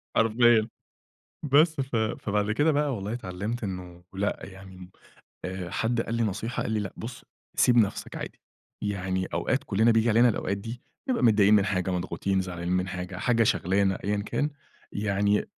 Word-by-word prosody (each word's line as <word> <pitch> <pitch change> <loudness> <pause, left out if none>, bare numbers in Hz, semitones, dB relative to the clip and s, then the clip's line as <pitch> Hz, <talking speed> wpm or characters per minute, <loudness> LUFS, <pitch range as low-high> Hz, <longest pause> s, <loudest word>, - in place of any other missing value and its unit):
حرفيًا، 115 0 +4 0.8
بس 155 +3 +5
ف 130 -2 -4
فبعد 105 -1 0
كده 145 +8 +3
بقى 145 -3 +1
والله 100 +2 -4
اتعلمت 110 +2 -4
إنه 90 -3 -6
لأ 100 +2 -1
يعني، 95 -1 -11 0.6
آآ، 90 -1 -5
حد 115 +1 0
قال 115 - -3
لي 115 - +1
نصيحة 110 +3 -2
قال - - -3
لي: 110 - +1
"لأ 100 -3 -4
بُصّ 115 +2 -8 0.3
سيب 125 -1 +4
نَفْسك 110 -4 +1
عادي، - - -7 0.4
يعني 95 -2 -1
أوقات - - -1
كلنا 110 +4 +3
بييجي 115 +1 +3
علينا 120 +3 +5
الأوقات 100 -2 -1
دي 115 +4 -7 0.3
نبقى 250 - +1
متضايقين 105 -2 +5
من 100 -1 +4
حاجة، 95 -2 0
مضغوطين، 95 +1 -1
زعلانين 90 -1 -3
من 90 +1 +1
حاجة، 90 0 -5
حاجة 115 +3 +2
شاغلانا 95 -2 +1
أيًّا 105 +1 0
كان، 145 +7 0 0.4
يعني 100 0 +1
105 Hz, 165 wpm, -27 LUFS, 95-115 Hz, 0.8 s, بس